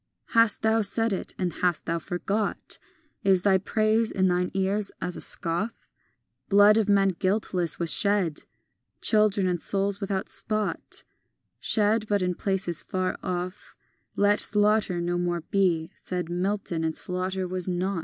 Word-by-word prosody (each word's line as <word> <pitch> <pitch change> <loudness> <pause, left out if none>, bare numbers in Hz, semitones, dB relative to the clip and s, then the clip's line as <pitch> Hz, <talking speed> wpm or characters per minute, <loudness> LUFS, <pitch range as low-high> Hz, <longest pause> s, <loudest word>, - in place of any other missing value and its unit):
VII - - -15
Hast 230 -2 +4
thou 220 0 +3
said 225 +2 0
it, 190 - -5
and 180 -3 -2
hast 175 -3 +1
thou 170 0 -1
forgot? 195 +4 -2 0.4
Is 190 -2 +3
thy 190 -2 +4
praise 215 +3 +1
in 190 -1 +1
thine 180 0 +1
ears 195 +1 0
as 180 - -4
a - - -5
scoff? 175 +8 -2 0.6
Blood 205 +1 +6
of 215 -2 +1
men 195 -1 +4
guiltless 185 -2 0
was 170 -2 +2
shed, 200 -7 +2 0.6
Children, 210 -3 +3
and 175 -2 -1
souls 200 0 +1
without 195 -1 -2
spot, 215 -1 -1 0.6
Shed, 215 0 +2
but 205 -2 +1
in 180 0 0
places 185 -3 -2
far 185 0 -2
off; 180 +2 -5 0.4
Let 205 +1 +3
slaughter 210 -3 +2
no 175 0 -1
more 175 -1 -1
be, 170 -2 0
said 180 -2 -5
Milton; 180 -2 -2
and 160 -1 -1
slaughter 185 +1 -3
was 185 0 -3
not. 185 +1 -1
190 Hz, 155 wpm, -26 LUFS, 180-205 Hz, 0.6 s, Blood